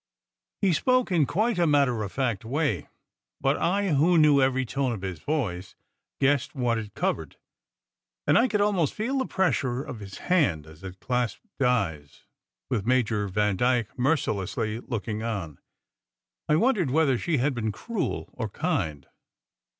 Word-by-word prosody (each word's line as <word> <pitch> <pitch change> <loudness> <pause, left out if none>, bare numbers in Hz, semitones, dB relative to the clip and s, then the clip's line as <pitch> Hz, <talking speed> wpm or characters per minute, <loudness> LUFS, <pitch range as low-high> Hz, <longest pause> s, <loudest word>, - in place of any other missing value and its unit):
He 190 -3 +4
spoke 255 - +2
in 160 -6 +3
quite 215 +1 0
a 170 - +3
matter 140 -6 +3
of 100 -2 -4
fact 120 -7 -1
way; 130 - -1 0.5
but 135 +1 +2
I, 195 +4 +1
who 165 +4 +4
knew 150 -3 +6
every 130 0 +2
tone 130 +1 -1
of 100 -4 -7
his 95 -4 -4
voice, 95 - -3 0.4
guessed 140 +1 +1
what 120 -3 +1
it 105 -2 -8
covered; - - -2 0.9
and - - +3
I 240 - +5
could 210 -4 0
almost 195 -8 +1
feel 255 +6 -1
the 260 - -1
pressure 135 -9 0
of 125 -6 -7
his 100 -2 -9
hand 135 - +1
as 80 +1 -15
it 95 -1 -8
clasped 125 - -2
Di 125 - +2
s, 75 -1 -22 0.4
with 120 -7 -1
Major 110 -3 +1
Vandyke 105 +4 +1
mercilessly 115 - -1
looking 110 -3 -4
on. 100 -10 -4 0.9
I 150 - +5
wondered 200 - +2
whether 135 -3 +2
she 165 -3 0
had 135 +3 +1
been 110 -3 -2
cruel 225 - -4
or 110 -4 -4
kind. 95 - -2
130 Hz, 160 wpm, -26 LUFS, 105-160 Hz, 0.9 s, knew